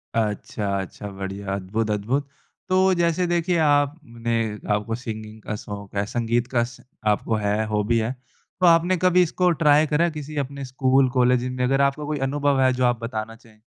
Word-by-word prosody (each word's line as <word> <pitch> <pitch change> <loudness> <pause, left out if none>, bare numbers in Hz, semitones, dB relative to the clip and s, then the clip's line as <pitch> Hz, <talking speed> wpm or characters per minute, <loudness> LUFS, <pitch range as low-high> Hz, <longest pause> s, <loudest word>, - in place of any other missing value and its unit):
अच्छा, 105 -2 -1
अच्छा 100 +2 -8
बढ़िया, 95 0 -5
अद्भुत, 105 +3 -2
अद्भुत। 120 +8 -1 0.4
तो 185 0 +4
जैसे 170 0 +1
देखिए 175 0 +1
आपने 145 -6 0 0.4
आपको 105 +2 -1
सिंगिंग 110 -3 -7
का 105 - -4
शौक 100 -1 -8
है, 100 - 0
संगीत 120 +2 -1
का 120 -2 +2
श 120 0 -9 0.3
आपको 105 +1 +1
है, 105 +1 0
हॉबी 105 +2 +1
है। 110 +2 -1 0.5
तो 185 - +3
आपने 170 +2 +5
कभी 180 +1 +4
इसको 180 +2 +1
ट्राई 150 +1 +5
करा 150 +3 +2
है 170 - 0
किसी 150 -1 -7
अपने 140 0 -3
स्कूल, 130 +1 +2
कॉलेज 125 -1 +2
में? 125 0 -2
अगर 135 +2 +2
आपका 140 +2 +1
कोई 150 0 -2
अनुभव 145 -1 +1
है 130 0 +4
जो 125 0 +1
आप 120 -1 +1
बताना 115 -1 -4
चाहें? 115 -2 -21
125 Hz, 185 wpm, -23 LUFS, 110-145 Hz, 0.5 s, आपने